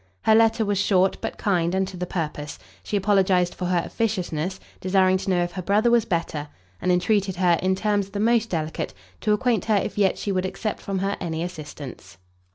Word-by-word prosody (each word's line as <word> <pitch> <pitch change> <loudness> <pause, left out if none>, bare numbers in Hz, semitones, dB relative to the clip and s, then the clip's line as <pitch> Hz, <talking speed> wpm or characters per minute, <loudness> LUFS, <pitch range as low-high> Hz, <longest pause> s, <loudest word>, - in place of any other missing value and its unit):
Her 220 - +5
letter 225 0 +4
was 205 -1 0
short, 190 -1 +3
but - - -4
kind 180 -3 +1
and 190 0 +1
to 190 - -8
the 180 0 -4
purpose: 150 -4 -4 0.2
she 210 - -2
apologized 190 -3 +2
for 180 - -4
her 175 -2 +1
officiousness, 190 -5 -2 0.2
desiring 185 0 +3
to 190 - -4
know 180 -2 +2
if 175 - -3
her 185 - -5
brother 210 +6 +2
was 235 -2 +4
better, 165 -4 -2 0.3
and 180 - +2
entreated 190 +1 +1
her, 175 -2 +3
in 190 0 +2
terms 205 0 0
the 200 - -5
most 230 +1 +2
delicate, 160 -2 -3 0.2
to 215 - 0
acquaint 220 -1 +1
her 220 - +2
if 200 - -2
yet 195 -2 +3
she 205 - -2
would 185 -1 0
accept 200 +3 -4
from 195 -1 -3
her 195 +2 -1
any 165 -2 -2
assistance. 150 - -8
190 Hz, 205 wpm, -24 LUFS, 175-205 Hz, 0.3 s, Her